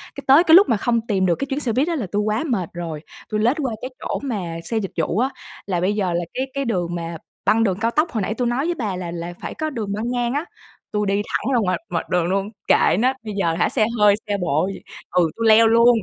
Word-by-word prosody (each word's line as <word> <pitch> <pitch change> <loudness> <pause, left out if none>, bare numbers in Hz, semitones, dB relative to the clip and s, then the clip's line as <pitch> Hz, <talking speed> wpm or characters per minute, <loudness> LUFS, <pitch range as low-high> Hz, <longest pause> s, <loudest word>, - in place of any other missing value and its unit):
cái - - -7
tới 275 +5 +7
cái 325 -2 +7
lúc 390 -2 +7
mà 230 - +3
không 235 +2 +1
tìm 195 -3 +1
được 175 -2 +3
cái 275 - -4
chuyến 275 - -1
xe 250 -6 -1
buýt 270 +6 +1
á 340 - 0
là 235 - -3
tui 205 0 +1
quá 215 +4 0
mệt 195 - -1
rồi, 165 -3 -5 0.3
tui 215 - -1
lết 240 +6 +2
qua 270 -6 -2
cái 255 - -5
chỗ - - -3
mà 195 -11 -3
xe 230 - -2
dịch 200 -4 -2
vụ 165 +4 0
á. 255 +2 +2 0.4
Là 180 -3 -1
bây 190 +3 +1
giờ 190 -4 0
là 175 0 -1
cái 260 - -1
cái 275 0 -2
đường 175 -7 -1
mà 170 -1 -5 0.3
băng 225 +1 +4
đường 190 -3 0
cao 230 - +1
tốc, 310 +5 +1
hồi 220 - -1
nãy 200 +3 -1
tui 245 +2 -1
nói 245 +4 0
với 345 +1 0
bà 215 - -3
là 180 -2 -5
là 170 0 -5
phải - - -5
có 315 0 -2
đường 220 -8 -4
băng 220 +4 -2
ngang 245 -1 0
á, 290 +4 -1 0.5
tui 210 -1 0
đi 200 +1 +1
thẳng 255 - -1
ra 240 - +4
ngoài 185 -4 +1
ngoài 170 -2 -2
đường 180 -2 +1
luôn, 195 +3 -1 0.2
kệ - - +4
nó, 255 +3 +3
bây 215 -2 -5
giờ 170 -4 +1
hả 170 - +1
xe 220 -5 +2
hơi, 205 -1 +6
xe 205 -1 0
độ 175 -1 0
gì - - -9 0.3
ừ, 175 -2 +3
tui 230 0 +1
leo 225 +1 +7
luôn. 235 +1 +5
215 Hz, 285 wpm, -21 LUFS, 180-245 Hz, 0.5 s, tới